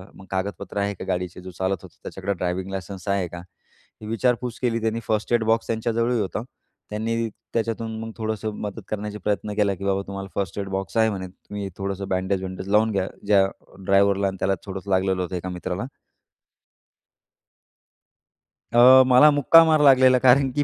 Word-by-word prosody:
मग 95 - -13
कागदपत्र 95 +1 -4
आहे 100 0 0
का - - -8
गाडीचे? 90 -1 -3
जो 95 0 -9
चालत 95 +2 -1
होतं - - -14
त्याच्याकडं 95 +1 -3
ड्रायव्हिंग 90 +2 -2
लायसन्स 95 -1 -7
आहे 100 -2 0
का? 85 +1 -9 0.6
हे 105 - -8
विचारपूस 120 +1 -1
केली 120 -2 0
त्यांनी. 110 +1 -1
फर्स्ट 110 +2 -1
एड 120 -2 +3
बॉक्स 115 +1 +1
त्यांच्याजवळही 115 +1 0
होता. 105 +1 -2 0.5
त्यांनी 115 +2 -2 0.3
त्याच्यातून 115 0 -2
मग 115 0 -6
थोडंसं 110 -1 -3
मदत 105 -2 -5
करण्याचे 105 0 -4
प्रयत्न 105 +1 -2
केला, 100 -2 +2
की 100 - -7
बाबा 100 0 +1
तुम्हाला 100 0 -6
फर्स्ट 100 -1 -3
एड 100 -1 -4
बॉक्स 95 +3 -4
आहे 110 0 +4
म्हणे. 95 -3 -4
तुम्ही 100 +2 -8
थोडंसं 100 0 -4
बँडेज-वँडेज 95 0 -2
लावून 110 +2 +3
घ्या. 95 -2 -1 0.2
ज्या 100 -2 +5 0.4
ड्रायव्हरला 100 0 +3
आणि 95 0 -4
त्याला 95 +1 +1
थोडंसं 95 0 -7
लागलेलं 95 0 +1
होतं 90 +1 -5
एका 90 +1 -4
मित्राला. 90 +3 -4 2.9
अ, - - +2 0.3
मला 130 +4 +7
मुक्का 145 +3 +6
मार 155 -2 +3
लागलेला 130 -2 +6
कारण 130 +2 +5
की 145 - +2
100 Hz, 170 wpm, -23 LUFS, 95-115 Hz, 2.9 s, मला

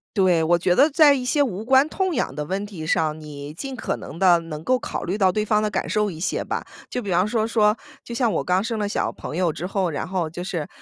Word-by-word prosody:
对， 180 -4 +3
我 170 +2 +3
觉 175 +1 +2
得 290 +8 +5
在 295 -1 +6
一 260 -2 -2
些 285 +3 +1
无 215 -6 -1
关 265 +4 +4
痛 375 +1 -1
痒 135 - -1
的 150 - -3
问 195 +6 -3
题 175 -7 -7
上， 155 -1 +1
你 150 -1 -8
尽 270 - -6
可 250 - -2
能 160 - -9
地 180 -3 +5
能 155 -2 -7
够 255 +9 +2
考 - - -5
虑 190 +4 -2
到 190 -3 +4
对 215 +2 -1
方 210 0 +2
的 210 - +1
感 - - -2
受 210 -1 +1
一 160 - -9
些 180 - -1
吧。 - - -4 0.2
就 250 - -3
比 200 - -6
方 180 +1 +3
说 220 +1 0
说， 215 -2 +3 0.3
就 235 - -8
像 235 -2 +1
我 - - 0
刚 180 +1 +2
生 225 +1 -3
了 205 -1 -1
小 - - 0
朋 160 - -7
友 175 -4 +1
之 175 - -5
后， 190 -1 0
然 145 - -3
后 180 -3 -2
就 175 +2 -6
是， 170 -5 -3
190 Hz, 295 characters per minute, -23 LUFS, 170-225 Hz, 0.3 s, 在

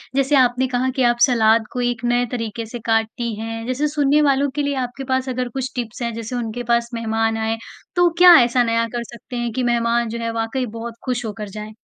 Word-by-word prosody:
जैसे 275 +1 +2
आपने 250 +1 +2
कहा 250 +1 +1
कि 260 - +3
आप 240 - -5
सलाद 225 -3 +3
को 250 - -3
एक 245 -1 -1
नए 245 0 +2
तरीके 230 -1 -4
से 235 +2 -7
काटती 225 +1 0
हैं 225 0 -5
जैसे 260 +4 0
सुनने 290 +1 +4
वालों 280 +1 +2
के 295 - 0
लिए 285 0 -1
आपके 245 +2 -8
पास 260 0 0
अगर 255 0 -2
कुछ 265 +1 -3
टिप्स 240 -1 -5
हैं 235 -1 -2
जैसे 230 +2 -5
उनके 240 0 -4
पास 235 0 +1
मेहमान 225 -1 0
आएँ 225 0 -1 0.4
तो 355 -1 +4
क्या 355 0 +9
ऐसा 245 +1 +2
नया 230 0 +1
कर 240 - -2
सकते 235 +1 -11
हैं 240 -1 -2
कि 255 - -1
मेहमान 235 -1 +1
जो 235 +1 -5
है 230 - -1
वाक़ई 230 +3 -2
बहुत 230 +1 -7
खुश 245 -2 -2
होकर 210 -1 -6
जाएँ? 210 +2 -8
240 Hz, 230 wpm, -20 LUFS, 225-255 Hz, 0.4 s, क्या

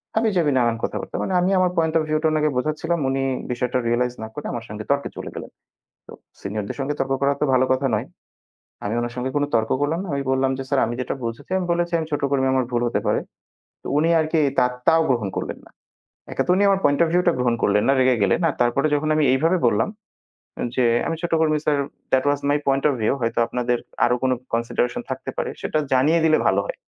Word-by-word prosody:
হাবি-জাবি 195 -9 +2
নানান 120 -2 +2
কথা - - -2
বার্তা। - - -9
মানে 190 - -2
আমি 180 +2 +1
আমার 180 -1 +2
পয়েন্ট 160 -1 +2
অফ 160 - +1
ভিউ 155 - +2
টা - - +4
ওনাকে 155 -1 +2
বোঝাচ্ছিলাম 155 +5 -1
উনি 135 0 0 0.3
বিষয়টা 125 +1 -1
রিয়ালাইজ 120 +1 +1
না - - -5
করে 150 - -7
আমার 115 -2 -5
সঙ্গে 105 +1 -6
তর্কে 140 0 0
চলে - - -6
গেলেন। - - -7 0.6
তো - - -11 0.3
সিনিয়রদের 100 +1 -4
সঙ্গে 140 +2 -1
তর্ক 135 0 0
করা 140 0 +3
তো - - +2
ভালো 130 0 +4
কথা 130 +1 0
নয়। - - -3 0.8
আমি 105 - -1
ওনার 120 0 -3
সঙ্গে 130 +1 -3
কোনো 145 0 +1
তর্ক 110 -1 +1
করলাম 160 +4 0
না। - - -7
আমি 140 0 -1
বললাম 130 0 +1
যে - - -3
স্যার 140 - +2
আমি 120 +1 -3
যেটা 125 - -3
বুঝেছি, 115 +8 -6
আমি 185 - -2
বলেছি 170 0 -1
আমি 160 - -3
ছোট 145 - -1
কর্মী 135 -1 +2
আমার 130 -1 +1
ভুল 120 -1 0
হতে - - 0
পারে। - - +2 0.6
তো - - -6
উনি 160 +3 +3
আরকি 160 +1 +1 0.2
তা - - +4 0.2
তাও 165 0 +5
গ্রহণ 120 -6 +1
করলেন - - -4
না। - - -19 0.6
এক - - -9
তো - - 0
উনি 195 - +2
আমার 195 -1 +3
পয়েন্ট 145 0 +3
অফ 170 - +3
ভিউ 180 - +3
টা 175 - +5
গ্রহণ 125 -1 +2
করলেন 105 0 +3
না - - +5
রেগে 130 -1 +4
গেলেন। 100 - +2
আর - - -2
তারপরে 120 +5 +1
যখন 150 +1 0
আমি 155 - +3
এইভাবে 165 +7 +2
বললাম, 105 0 +1 0.9
যে 125 - +3 0.2
আমি 165 - -1
ছোট 175 - -3
কর্মী 155 -1 +2
sir 145 -2 +2 0.3
that 130 +1 +3
was 145 - 0
my 145 - +3
point 135 0 +1
of - - -1
view 110 - +2
হয়তো 115 -1 -1
আপনাদের 125 0 -1 0.3
আরো 120 - +3
কোন 130 - +2 0.2
কনসিডারেশন 120 +1 -1
থাকতে - - -4
পারে - - -2
সেটা 155 - -1
জানিয়ে 150 +6 +4
দিলে 155 -1 +4
ভালো - - +3
হয়। - - -5
135 Hz, 235 wpm, -22 LUFS, 120-160 Hz, 0.9 s, তাও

